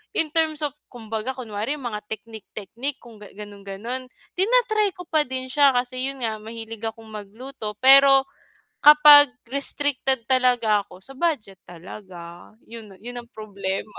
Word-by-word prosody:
in 310 -2 0
terms 315 -2 0
of 290 - -1 0.2
kumbaga, 225 +1 -6
kunwari 230 +2 -4
mga 240 -7 -5
teknik-teknik 220 +4 -7
kung 230 -3 -15
gan 205 -1 -14
gano'n-gano'n, 205 +5 -8 0.3
tina-try 430 -1 +2
ko 360 - -9
pa 305 -3 +1
din 260 0 -5
siya 280 -3 +4
kasi 255 +1 -1
'yun 270 -2 -6
nga, 220 -1 -2
mahilig 225 0 -9
akong 225 0 -9
magluto. 215 +2 -8
Pero 270 0 +7 0.6
kapag 295 -1 +9 0.2
restricted 270 -3 -1
talaga 245 -5 +2
ako, 185 +1 -16
sa 270 - -11
budget 265 - -3
talaga. 175 0 -12
'Yun 220 -4 -12
'yun 245 0 -7
ang 235 - -18
problema. 200 -2 -6
240 Hz, 140 wpm, -23 LUFS, 210-275 Hz, 0.6 s, kapag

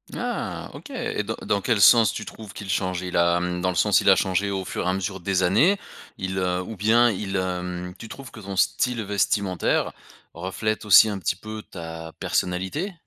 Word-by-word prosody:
Ah - - -4
OK. - - -11
Et 250 - -3
dans 110 +2 -4
dans 100 - 0
quel 115 +1 +1
sens 110 +1 +7
tu - - -6
trouves 105 -4 -10
qu'il 105 -2 -8
change? 95 -1 -1
Il 90 -1 -5
a, 85 0 +4
hem, 90 0 -2
dans 90 - +1
le 90 - -2
sens, 105 +2 +4
il - - +3
a 95 - +8
changé 95 +1 0
au 95 -1 -3
fur - - -4
et - - +1
à - - +1
mesure 95 0 -3
des 95 +1 0
années? 130 - +4 0.4
Il 95 0 -3
heu, 90 -1 0
ou 110 +4 -7
bien 115 +4 +4
il, 95 -1 -4
hem, 90 -1 -3
tu 115 - -10
trouves 135 +4 -10
que - - -11
ton 100 -2 -6
style 115 +4 +1
vestimentaire 100 -2 0 0.4
reflète 105 +5 -3
aussi 105 +2 +8
un 100 -2 -3
petit 85 - -1
peu 110 +2 -8
ta 80 -2 -8
personnalité? 95 - -1
95 Hz, 210 wpm, -24 LUFS, 90-110 Hz, 0.4 s, a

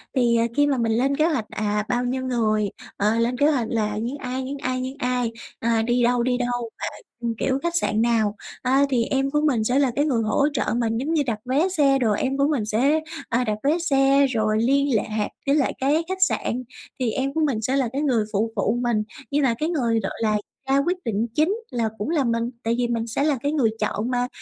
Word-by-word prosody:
Thì 235 -2 +3 0.2
khi 290 0 +4
mà 275 -2 +1
mình 230 -1 +1
lên 265 +5 +1
kế 310 - +3
hoạch, 260 -10 -1
à, 210 0 -1
bao 245 0 +1
nhiêu 260 +1 -2
người, 215 -4 +1 0.3
ờ, 210 +2 +2
lên 240 +2 0
kế 290 - +4
hoạch 245 -6 0
là 210 -2 -1
những 240 +6 -3
ai, 260 0 -4
những 280 +2 -5
ai, 255 -2 -2
những 260 +2 -4
ai, 250 -2 0 0.3
à, 230 -1 +1
đi 240 +1 +1
đâu, 240 0 +2
đi 250 0 +1
đâu, 245 -1 -2 0.5
ờ, 235 - -2
kiểu, 265 0 0
khách 340 0 -1
sạn 220 -9 +1
nào. 220 -3 +2 0.3
Ờ, 255 - 0 0.2
thì 240 -3 +2
em 270 0 0
của 295 +1 +1
mình 260 -8 +1
sẽ 250 +4 +2
là 270 -3 +3
cái 290 - +3
người 250 -7 +1
hỗ 280 +6 +2
trợ - - 0
mình, 225 -1 0
giống 305 +6 -1
như 305 - +3
đặt 220 -3 -1
vé 280 +9 +2
xe 280 -6 +3
đồ, 225 -5 +2
em 265 +6 0
của 280 - +3
mình 260 -9 0
sẽ, 265 +9 +2 0.3
à, 245 +1 +1
đặt 215 -2 -1
vé 305 +4 +3
xe, 275 -4 +3
rồi 220 -3 0
liên 275 0 +2
lạc 215 0 -1 0.2
với 280 - +3
lại 280 - +2
cái 295 +5 +2
khách 375 0 -4
sạn, 255 -8 +1 0.4
thì 245 -3 +1
em 270 +4 -1
của 320 - 0
mình 270 -8 +1
sẽ 260 +5 0
là 260 -4 +1
cái 280 +2 -1
người 240 -7 +2
phụ 220 +3 0
phụ 215 +4 +1
mình. 230 -3 +1 0.3
Nhưng 290 +1 +1
mà 245 -4 +3
cái 310 - -1
người 235 -9 +1
gọi - - -3
là 215 -1 +2 0.3
ra 270 - +4
quyết 360 +1 +1
định 225 0 0
chính 320 +7 +2 0.2
là 230 -2 0
cũng 210 +10 -3
là 300 -5 +2
mình, 230 0 0
tại 230 +1 0
vì 245 -1 +1
mình 230 -1 -1
sẽ 255 +5 -1
là 290 -5 +1
cái 285 +1 0
người 250 -8 +2
chọn 215 +3 -1
mà, 245 0 0
250 Hz, 245 wpm, -23 LUFS, 225-275 Hz, 0.5 s, khi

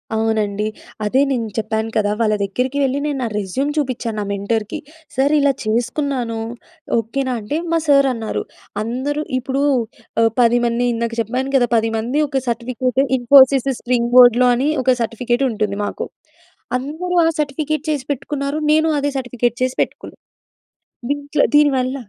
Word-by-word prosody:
అవునండి. 215 -2 0 0.4
అదే 255 +6 +2
నేను 235 -4 -1
చెప్పాను 220 0 -1
కదా! 205 -1 +1
వాళ్ళ 215 -2 +2
దగ్గరికి 250 +8 -2
వెళ్లి 270 +1 0
నేను 295 -2 -1
నా - - 0
రెజ్యూమ్ 210 +9 -2
చూపించాను 250 -6 -2
నా 210 - -1
మెంటర్‌కి. 210 +2 -2 0.4
సార్ 275 +3 +2
ఇలా 285 -1 +4
చేసుకున్నాను 240 +1 -1 0.6
ఓకేనా 255 +4 -1
అంటే, 220 +8 -3
మా 335 - +3
సార్ 275 -1 +5
అన్నారు, 225 -2 -3 0.4
"అందరూ" 260 +7 -2 0.2
ఇప్పుడు 265 +2 -2 0.6
ఆహ్, 225 0 +4
10 240 0 +4
మంది 235 +1 0
ఇందాక 230 0 -2
చెప్పాను 255 +5 -2
కదా! 245 -2 +4
10 225 0 +1
మంది 240 +6 -2
ఒక 270 -2 -1
సర్టిఫికేట్ 250 +2 -1 0.2
ఇన్ఫోసిస్ 265 +1 +6
స్ట్రీమ్ 240 -1 0
బోర్డ్‌లో 250 0 +7
అని 270 +5 +1
ఒక 255 0 +3
సర్టిఫికేట్ 240 +3 -1
ఉంటుంది 210 -2 -2
మాకు. - - -4 0.7
"అందరూ 315 +7 -4
ఆ - - +4
సర్టిఫికేట్ 300 +1 -2
చేసి 290 -3 -2
పెట్టుకున్నారు. 280 +1 -4
నేను 315 +1 +3
అదే 285 0 -1
సర్టిఫికేట్ 245 -2 -1
చేసి 255 0 -1
పెట్టుకున్నాను. - - -11 0.9
దీంట్లో 285 +1 0
దీనివల్ల 270 -3 +3
250 Hz, 145 wpm, -19 LUFS, 230-275 Hz, 0.9 s, బోర్డ్‌లో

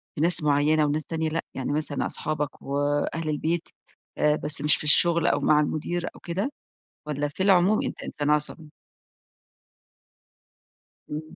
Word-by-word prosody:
في 145 - -3
ناس 170 -1 +4
معيّنة 150 +1 +3
وناس 150 +1 -1
تانية 160 -1 -2
لأ؟ 165 +1 -2
يعني 135 +1 -4
مثلًا 150 -1 -1
أصحابك 150 -2 -4
وأهل 145 +3 -1
البيت 160 +3 -2 0.5
آآ 150 0 +3
بس 150 -1 -1
مش 150 +1 +4
في - - -6
الشغل 170 +2 +5
أو - - +2
مع 150 - +3
المدير 165 +3 -2
أو - - -13
كده، 190 +10 -3 0.6
والّا 145 0 -2
في 155 +6 -4
العموم 195 +1 +4
أنت - - -5
إنسان 145 0 -3
عصبي؟ 150 +1 -1 2.4
امم. 150 +1 -4
150 Hz, 150 wpm, -25 LUFS, 145-165 Hz, 2.4 s, الشغل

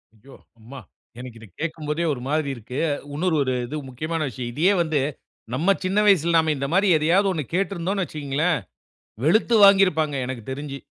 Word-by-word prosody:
ஐயோ! 130 +6 -17 0.2
அம்மா, 125 +5 -11 0.4
எனக்கு 125 -2 -9
இத 115 - -12
கேட்கும்போதே 155 0 -3
ஒரு 125 - -7
மாரி 150 0 0
இருக்கு. 120 +3 -7 0.3
இன்னொரு 165 +3 0
ஒரு 130 -1 -1
இது 150 +6 -5
முக்கியமான 155 +6 -4
விஷயம். 120 +1 -6
இதையே 170 +9 +3
வந்து 160 -3 0 0.6
நம்ம 170 +9 +2
சின்ன 190 +2 0
வயசில 170 -4 +3
நாம 160 -1 +2
இந்தமாரி 170 +9 +1
எதையாவது 175 +6 +2
ஒன்னு 155 -5 -3
கேட்டிருந்தோன்னு 195 0 -1
வச்சிக்கங்களேன், 150 +1 -1 0.7
வெளுத்து 220 +9 +3
வாங்கியிருப்பாங்க 185 -7 +4
எனக்கு 130 -2 -6
தெரிஞ்சு. 140 +1 -6
155 Hz, 155 wpm, -23 LUFS, 135-180 Hz, 0.7 s, வாங்கியிருப்பாங்க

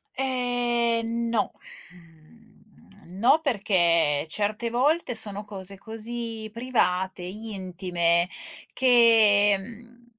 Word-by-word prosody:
Ehm, 240 -3 -1
no. 225 -3 0 0.4
Mhmm, 185 +2 -19
no 250 +8 +4
perché 175 - +1
certe 210 +6 -2
volte 260 +3 0
sono 205 -1 -4
cose 195 -1 -8
così 225 +1 -6
private, 190 -7 -1
intime 180 -4 -1 0.5
che, 225 -5 +5
mhmm, 235 +4 -13
215 Hz, 85 wpm, -25 LUFS, 185-235 Hz, 0.5 s, che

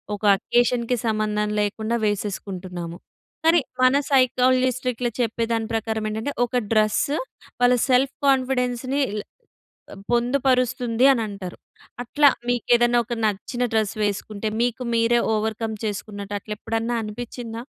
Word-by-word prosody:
ఒక 205 - -14
అకేషన్‌కి 240 +2 +1
సంబంధం 215 -1 0
లేకుండా 220 +2 -1
వేసేసుకుంటున్నాము. 185 -4 -4 0.5
కానీ, 330 +1 +6 0.2
మన 255 +1 +5 0.2
సైకాలజిస్ట్ 255 -1 +3
ఇట్లా 240 +1 -2
చెప్పే 230 0 -1
దాని 225 -1 -1
ప్రకారం 220 -1 -2
ఏంటంటే 220 +6 -3
ఒక 245 - -15 0.2
డ్రెస్సు 215 +7 +2 0.4
వాళ్ళ 245 0 +5
సెల్ఫ్ 265 +2 +3
కాన్ఫిడెన్స్‌ని 260 0 +1
ఇల్ 210 0 -4 0.7
ఆహ్, 195 - -11
పొందుపరుస్తుంది 250 -1 +2
అని 240 - -1
అంటారు. 195 -3 -7 0.5
అట్లా 290 +4 +4 0.2
మీకేదన్నా 240 0 +3
ఒక 240 - -4
నచ్చిన 215 +4 -2
డ్రెస్ 220 -1 +1
వేసుకుంటే, 205 +1 -2
మీకు 245 +1 0
మీరే 230 +1 +3 0.2
ఓవర్‌కమ్ 220 +1 -2
చేసుకున్నట్టు 205 -1 -5
అట్లా 210 +2 -6
ఎప్పుడన్నా 225 +1 -2
అనిపించిందా? 230 +1 -6
230 Hz, 120 wpm, -23 LUFS, 215-250 Hz, 0.7 s, కానీ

